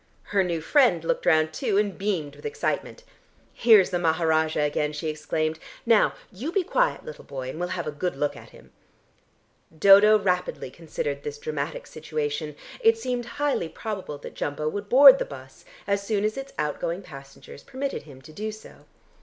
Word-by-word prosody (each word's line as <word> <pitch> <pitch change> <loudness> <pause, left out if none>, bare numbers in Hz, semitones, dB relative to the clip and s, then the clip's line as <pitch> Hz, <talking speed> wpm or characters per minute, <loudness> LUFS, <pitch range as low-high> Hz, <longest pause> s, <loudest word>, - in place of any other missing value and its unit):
Her 195 -2 +1
new 170 -3 -2
friend 180 - +3
looked - - -1
round 155 -2 +3
too, 195 - -1
and 205 -2 +1
beamed 185 -8 -2
with - - -16
excitement. 450 +2 -3 0.5
"Here's 220 -5 +5
the 175 - 0
Maharajah 160 -2 +1
again!" 150 0 -1
she 155 +1 -3
exclaimed. 155 +1 -2 0.3
"Now 230 -3 +4 0.2
you 235 - -5
be 390 0 +1
quiet, - - 0
little 475 - -9
boy, 130 -2 -6
and 155 - -9
we'll 180 0 -2
have 170 - -3
a 150 - -3
good 150 +2 -3
look 145 +1 -1
at - - -13
him." - - -18 1.1
Dodo 200 +5 +7
rapidly 180 -9 -2
considered 145 -3 -4
this 145 0 -6
dramatic 150 +1 -4
situation. 150 -1 -4 0.2
It 455 -1 +4
seemed 250 - -3
highly 285 - 0
probable 195 -9 -6
that 145 - -10
Jumbo 150 +1 -3
would 205 +4 -6
board 270 +1 +9
the - - 0
bus, 130 -1 -12 0.2
as 200 0 0
soon 205 0 -1
as 215 0 0
its 270 0 -7
outgoing 165 +5 -2
passengers 140 -2 -12
permitted 275 0 -4
him 140 -3 -15
to 155 - -13
do 215 +5 -4
so. 215 0 -14
170 Hz, 180 wpm, -25 LUFS, 150-215 Hz, 1.1 s, board